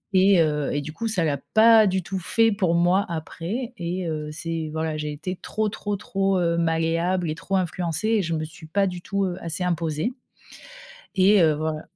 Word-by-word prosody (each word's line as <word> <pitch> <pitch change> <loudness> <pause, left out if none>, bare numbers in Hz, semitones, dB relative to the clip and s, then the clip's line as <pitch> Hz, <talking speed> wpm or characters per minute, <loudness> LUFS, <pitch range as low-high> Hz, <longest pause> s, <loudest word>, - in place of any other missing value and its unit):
et 190 -1 +6
heu, 150 -2 0
et 145 - 0
du 150 +2 -7
coup 225 +8 -3
ça 200 -6 0
l'a 145 -3 0 0.2
pas 220 -1 +7
du 190 -1 0
tout 190 +3 -4
fait 225 +6 +2
pour 185 -5 +1
moi 175 +3 +3
après 175 - -4
et 180 +1 -3
heu, 155 -1 -3
c'est 165 0 -4
voilà, 160 0 -2
j'ai 150 0 -3
été 170 +5 -5
trop 215 0 -1
trop 205 0 -3
trop, 195 -1 0
heu, 170 -1 +1
malléable 165 +2 0
et - - -3
trop 190 +3 -3
influencée 175 +1 -1
et 225 -2 +3
je 170 -1 -2
me 155 0 -2
suis 160 +1 -12
pas 195 +5 +1
du 180 -1 -5
tout, 200 +2 -1
heu, 180 -1 -3
assez 165 +2 -3
imposée 165 +2 -1 1.0
et 195 +1 +5
heu, 160 -2 +5
voilà. 155 0 -3
175 Hz, 205 wpm, -24 LUFS, 160-195 Hz, 1.0 s, pas